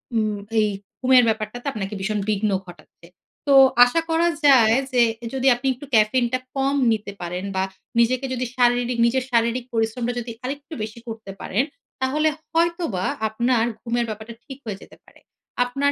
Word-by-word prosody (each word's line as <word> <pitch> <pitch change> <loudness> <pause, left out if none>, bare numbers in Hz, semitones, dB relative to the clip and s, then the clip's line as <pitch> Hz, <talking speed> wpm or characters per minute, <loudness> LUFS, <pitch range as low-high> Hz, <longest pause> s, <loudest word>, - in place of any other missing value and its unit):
উম 215 -2 0 0.2
এই 210 -1 +3 0.3
ঘুমের 255 -1 +5
ব্যাপারটাতে 220 +3 -3
আপনাকে 200 -1 -4
ভীষণ 210 +2 -1
বিঘ্ন 210 0 +1
ঘটাচ্ছে। 175 -1 -16 0.4
তো 280 - +4 0.3
আশা 330 +7 +1
করা 330 +1 +3 0.2
যায় 230 -5 +6 0.2
যে 250 -1 +3 0.3
যদি 265 0 0
আপনি 245 +2 -4
একটু 270 +4 -11
caffeine 230 +3 +3
টা 255 - +2 0.2
কম 275 +1 +1 0.2
নিতে 210 -2 -2
পারেন 180 +2 -4
বা 190 - +1 0.4
নিজেকে 255 +3 +2
যদি 255 0 -2
শারীরিক 245 0 +2
নিজের 255 +2 +1
শারীরিক 235 +1 +1
পরিশ্রমটা 230 +2 -1
যদি 235 0 -6
আরেকটু 285 +4 -6
বেশি 220 +2 -7
করতে 220 -3 -7
পারেন, 220 +7 0 0.4
তাহলে 300 +4 +2 0.2
হয়তোবা 335 - 0 0.2
আপনার 235 +1 +1 0.2
ঘুমের 240 0 -1
ব্যাপারটা 220 +2 -7
ঠিক 270 -3 -9
হয়ে 205 -3 -5
যেতে - - -15
পারে। - - -21 0.5
আপনার 275 +3 0
240 Hz, 160 wpm, -22 LUFS, 215-260 Hz, 0.5 s, যায়